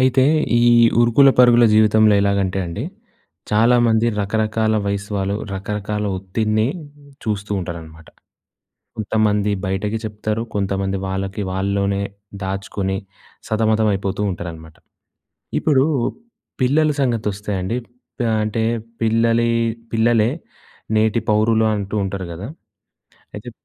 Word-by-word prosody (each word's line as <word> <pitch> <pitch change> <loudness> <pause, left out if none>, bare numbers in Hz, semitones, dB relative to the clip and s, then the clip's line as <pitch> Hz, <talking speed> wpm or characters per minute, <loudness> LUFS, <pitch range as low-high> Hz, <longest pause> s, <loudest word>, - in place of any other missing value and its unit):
అయితే 130 0 +4 0.4
ఈ - - +3 0.4
ఉరుకుల 120 +4 +5
పరుగుల 120 -1 +6
జీవితంలో 110 0 +5
ఎలాగంటే 100 -1 0
అండి, 85 +8 -5 0.7
చాలామంది 115 +1 +3
రకరకాల 110 +1 0
వయసు 100 +1 -3
వాళ్ళు, 100 +1 -1 0.2
రకరకాల 105 +2 -3
ఒత్తిడిని 110 +3 0 0.6
చూస్తూ 105 -2 -3
ఉంటారనమాట. 80 -3 -8 0.9
కొంతమంది 105 -1 +1
బయటకి 100 +3 -2
చెప్తారు. 105 +1 -3
కొంతమంది 95 -1 -1
వాళ్ళకి 95 +1 -3
వాళ్ళలోనే 100 +1 -1 0.4
దాచుకొని 95 0 -3 0.5
సతమతమైపోతూ 110 -3 0
ఉంటారనమాట. 80 -3 -8 0.8
ఇప్పుడు 140 -3 +3 0.8
పిల్లల 150 +4 +3
సంగతొస్తే 105 -5 -1
అండి 95 +6 -2 0.4
ప - - +2 0.2
అంటే 110 +1 -1 0.4
పిల్లలే 115 +1 +2 0.4
పిల్లలే 115 -1 +3 0.7
నేటి 110 +1 +2
పౌరులు 110 +1 +3
అంటూ 100 0 -4
ఉంటారు 95 -1 -4
గదా! 85 +5 -7 0.9
అయితే - - -8
105 Hz, 95 wpm, -20 LUFS, 95-110 Hz, 0.9 s, పరుగుల